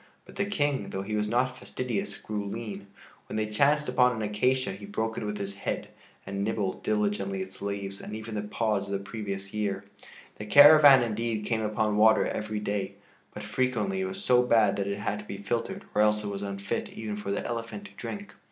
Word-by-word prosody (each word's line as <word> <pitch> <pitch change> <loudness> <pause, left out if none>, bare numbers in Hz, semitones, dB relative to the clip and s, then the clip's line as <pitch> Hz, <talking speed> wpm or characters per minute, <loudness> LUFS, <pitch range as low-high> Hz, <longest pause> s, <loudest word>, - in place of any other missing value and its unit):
But - - -14
the 200 - -1
King, 145 -8 0
though 95 - -3
he 105 +2 -3
was 105 0 0
not 125 +3 0
fastidious, 125 -5 -3
grew 105 -1 -4
lean. 100 -2 -6 0.4
When - - -6
they 110 0 +1
chanced 140 +8 +2
upon 125 -1 +3
an 110 - -3
acacia 125 +5 +1
he 100 +1 -9
broke 110 +2 -2
it - - -4
with 105 0 -3
his 100 -1 -5
head, - - -3 0.4
and 100 0 -3
nibbled 105 -3 -1
diligently 100 -2 0
its 95 0 -12
leaves 100 -1 -4
and 105 - -6
even 110 0 -7
the 105 - -1
pods 105 -1 -1
of 100 - -4
the - - +1
previous 100 -1 -6
year. 100 -2 -1 0.5
The 105 - -6
caravan 145 0 +9
indeed 110 -1 -2
came 115 -2 0
upon 105 -1 0
water 110 +1 +6
every 105 0 -3
day, 100 -1 -2 0.4
but 105 - -8
frequently 130 - 0
it - - 0
was 195 +1 -5
so 125 -7 +5
bad 115 -4 +4
that 100 -1 -1
it 100 0 -2
had 105 0 -2
to 105 - -9
be 100 - -6
filtered 120 - -3
or 105 - +3
else 105 0 +3
it 105 - -3
was 100 0 -4
unfit 100 0 -3
even 110 -1 -4
for 105 -1 -6
the 100 - -1
elephant 115 - -4
to - - -11
drink. 205 -1 -7
105 Hz, 215 wpm, -28 LUFS, 100-120 Hz, 0.5 s, caravan